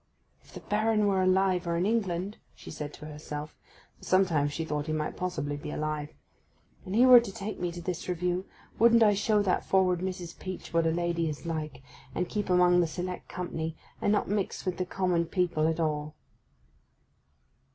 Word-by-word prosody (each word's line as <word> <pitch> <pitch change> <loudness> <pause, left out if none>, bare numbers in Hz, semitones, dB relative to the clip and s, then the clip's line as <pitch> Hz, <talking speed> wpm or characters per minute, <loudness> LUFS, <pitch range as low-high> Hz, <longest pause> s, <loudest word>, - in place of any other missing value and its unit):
'If - - -20
the - - -7
Baron 215 0 +1
were 195 -2 +2
alive, 185 -1 +2
or 170 0 0
in 175 - +1
England,' 200 -3 -1 0.2
she - - -11
said 150 -1 -5
to - - -11
herself 150 0 -7 0.4
(for - - -20
sometimes 170 -6 +2
she 165 +2 -3
thought 150 -1 -3
he 155 - -1
might 155 -1 -2
possibly 150 -6 -3
be 145 - -7
alive), 150 -1 -3 0.7
'and 190 0 -4
he 245 +3 +6
were 250 -1 +10
to 235 -4 -5
take 210 0 -6
me 175 -1 -1
to 175 0 -7
this 180 0 -4
Review, 180 +1 -1 0.3
wouldn't 230 +1 +6
I 210 -1 +5
show 210 +1 +2
that 190 - +1
forward 185 -2 +2
Mrs. 180 -2 -5
Peach 185 -2 -7
what 165 -1 +3
a - - +2
lady 170 -1 0
is 150 +2 -7
like, 155 -5 -4 0.3
and 180 - 0
keep 205 0 -3
among 180 0 +5
the 175 - +3
select 180 +3 -5
company, 165 -3 -4 0.2
and 205 - +2
not 210 - +1
mix 200 -1 -2
with 185 -1 -1
the 185 - -2
common 180 -3 0
people 170 -4 +1
at 160 0 -1
all! 150 -1 -1
180 Hz, 195 wpm, -29 LUFS, 160-190 Hz, 0.7 s, were